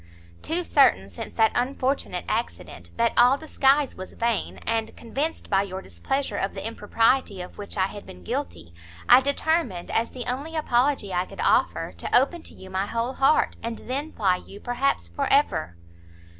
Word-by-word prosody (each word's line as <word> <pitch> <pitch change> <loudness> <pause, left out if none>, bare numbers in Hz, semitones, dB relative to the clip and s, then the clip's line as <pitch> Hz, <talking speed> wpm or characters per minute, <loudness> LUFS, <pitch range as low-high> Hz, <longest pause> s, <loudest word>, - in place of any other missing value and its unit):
"Too 345 +3 -1
certain, 185 - +3
since 85 - -6
that 220 -1 +3
unfortunate 255 -6 -1
accident, 85 0 -4
that 235 0 +2
all 250 +3 +6
disguise 285 -2 +2
was 185 - -8
vain, 230 -2 -1
and 225 -1 -1
convinced 285 +8 -3
by 195 -1 +3
your 190 -1 -5
displeasure 190 - -3
of 195 - -2
the - - -5
impropriety 225 0 +1
of 180 +3 -9
which 205 0 -6
I 190 - +3
had 205 +1 -8
been 90 0 -12
guilty, 85 -1 -5 0.3
I 250 +2 +8
determined, 280 - 0
as 230 +1 +1
the 250 -2 -6
only 280 +6 -3
apology 255 -7 +1
I 180 +1 0
could - - -12
offer, - - +2
to - - +2
open 320 +6 -1
to - - -10
you 190 0 -12
my 190 +2 -1
whole 230 +4 -2
heart, 270 +3 +3
and 230 0 -4
then 280 +5 -3
fly 190 -4 +1
you 200 +2 -12
perhaps 245 - -1
for 85 - -2
ever. 85 +2 +2
230 Hz, 175 wpm, -25 LUFS, 190-270 Hz, 0.3 s, I